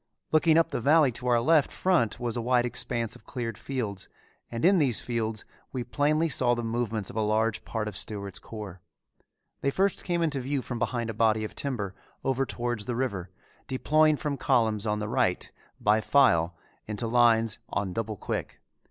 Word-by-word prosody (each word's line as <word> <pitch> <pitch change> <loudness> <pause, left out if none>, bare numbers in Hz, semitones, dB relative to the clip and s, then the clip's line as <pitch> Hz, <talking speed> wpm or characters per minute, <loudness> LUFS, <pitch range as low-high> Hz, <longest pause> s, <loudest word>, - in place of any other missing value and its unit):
Looking 155 0 +4
up 165 - +3
the - - -2
valley 145 +1 +5
to 125 +2 -6
our 120 -1 +4
left 150 +4 +3
front 170 - +1
was 120 -2 -2
a 120 - -1
wide 125 +1 +2
expanse 120 -2 -2
of - - -16
cleared 115 -2 -4
fields 110 -7 -4 0.4
and 115 +4 -2
in 190 0 +6
these 130 -7 +2
fields 115 -2 -3 0.3
we 125 -2 -3
plainly 150 +5 +1
saw 125 -5 +2
the 120 - -3
movements 115 -3 -2
of - - -14
a 110 - +1
large 110 +1 +1
part 110 -2 -3
of 105 - -5
Stewart's 100 -2 -5
corps. 100 -5 -8 0.8
They 140 - +2
first 195 +7 +1
came 175 -2 0
into 150 -4 0
view 135 +1 -2
from 120 -2 -5
behind 120 -2 -1
a - - -7
body 110 0 +2
of 110 - -5
timber 110 -9 -3 0.3
over 135 0 0
towards 120 -3 -3
the 120 - -2
river, 100 -8 -2 0.4
deploying 155 +3 +3
from 145 -1 -2
column 115 -6 +2
on 105 0 +1
the 105 0 -3
right 115 -6 0 0.3
by 105 +1 +3
file 95 -8 +3 0.3
into 105 +2 -3
line 115 -1 +4 0.2
on 100 -3 -2
double 110 0 -3
quick. - - -4
120 Hz, 185 wpm, -28 LUFS, 110-135 Hz, 0.8 s, in